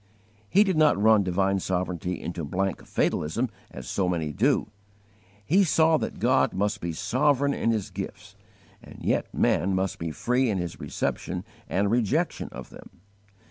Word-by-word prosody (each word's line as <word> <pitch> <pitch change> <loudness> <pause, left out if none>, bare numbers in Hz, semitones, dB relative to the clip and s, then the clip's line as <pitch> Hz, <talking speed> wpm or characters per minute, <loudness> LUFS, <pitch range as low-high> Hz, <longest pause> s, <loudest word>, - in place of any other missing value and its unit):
He 200 - +6
did 190 -5 0
not 155 -9 +4
run 110 0 +5
divine 95 +1 +1
sovereignty 90 -1 -2
into 85 -1 -5
blank 95 +5 -2
fatalism 115 +11 0 0.2
as 65 -2 -9
so 95 -2 0
many 80 -4 -1
do. 120 0 +1 0.7
He 190 - +4
saw 160 -2 +4
that - - -4
God - - +2
must 105 +2 -1
be 85 - -2
sovereign 140 - +1
in 115 - 0
His 110 -4 -1
gifts, - - -7 0.5
and - - -13
yet - - 0
man 95 +1 +1
must 95 0 -1
be 80 - -3
free 125 +9 0
in 100 - 0
his 85 -2 -4
reception - - -3 0.2
and 100 +2 +1
rejection 115 -3 0
of - - -9
them. - - -12
100 Hz, 160 wpm, -26 LUFS, 90-125 Hz, 0.7 s, He